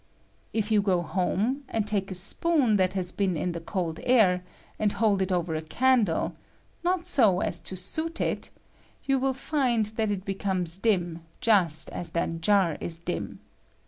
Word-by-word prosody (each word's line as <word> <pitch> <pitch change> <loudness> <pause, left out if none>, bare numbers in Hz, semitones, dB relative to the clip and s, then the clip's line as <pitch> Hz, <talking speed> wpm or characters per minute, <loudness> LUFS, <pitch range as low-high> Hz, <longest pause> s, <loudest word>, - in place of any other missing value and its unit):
If 220 -1 -1
you 210 -1 +5
go 185 -3 +1
home, 200 - -1
and 220 -2 -1
take 200 -2 -1
a 190 - -3
spoon 255 - +1
that 185 0 +1
I - - +1
iias 180 0 -2
been 190 -4 0
ia 150 - -2
the 170 - -4
cold 165 -2 -3
air, 195 -8 +4 0.4
and 210 -1 +1
hold 205 -2 +2
it 190 0 0
over 175 -2 0
a 155 - -1
I - - -6
candle 225 +2 +2 0.2
— - - -36
not 355 0 0
so 215 -10 +3
as - - -1
to 190 - -5
soot 315 - -3
it - - -1 0.3
— - - -32
you 270 -1 +2
^111 265 0 0
find 255 -5 +1
that 220 0 -1
rit 200 -2 -3
becomes 190 -3 -2
dim 175 -6 0 0.2
just 190 -10 +2
as 175 - -5
that 165 0 -1
jar 190 -3 +3
is 165 -1 -2
dim. 170 +1 -5
195 Hz, 190 wpm, -27 LUFS, 180-225 Hz, 0.4 s, you